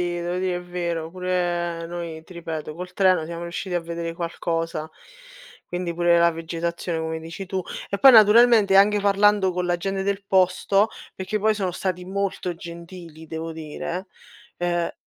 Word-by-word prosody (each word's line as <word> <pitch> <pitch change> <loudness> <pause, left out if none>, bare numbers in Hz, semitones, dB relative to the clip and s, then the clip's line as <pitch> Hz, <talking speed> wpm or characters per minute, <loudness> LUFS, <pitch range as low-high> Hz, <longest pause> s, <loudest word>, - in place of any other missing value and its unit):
devo 175 0 -2
dire 185 -1 0
è - - -4
vero, 170 -2 -4
pure 175 -2 -1
noi, 170 -2 -6
ti 185 - -14
ripeto, 160 -3 -5
col 180 +1 -7
treno 185 -4 +3
siamo 170 +1 -6
riusciti 175 +2 -5
a - - +3
vedere 170 0 -5
qualcosa, 165 -2 -3 0.7
quindi 175 -1 -4
pure 175 0 +4
la 170 0 +4
vegetazione 165 +1 -3
come 160 0 -3
dici 165 +4 -7
tu. 185 0 -2 0.3
E 200 - -2
poi 270 - +9
naturalmente 220 -2 +7
anche 205 +1 +6
parlando 200 -1 +3
con 180 0 -2
la 175 0 +1
gente 195 +2 -2
del 200 0 -2
posto 190 +2 +3 0.3
perché 190 +3 -3
poi 215 +1 +2
sono 190 -3 -1
stati 180 0 -3
molto 190 -1 -2
gentili 170 -1 -10
devo 160 +1 -5
dire 160 +4 -5 0.5
ehm 175 -1 -1
175 Hz, 165 wpm, -24 LUFS, 170-190 Hz, 0.7 s, poi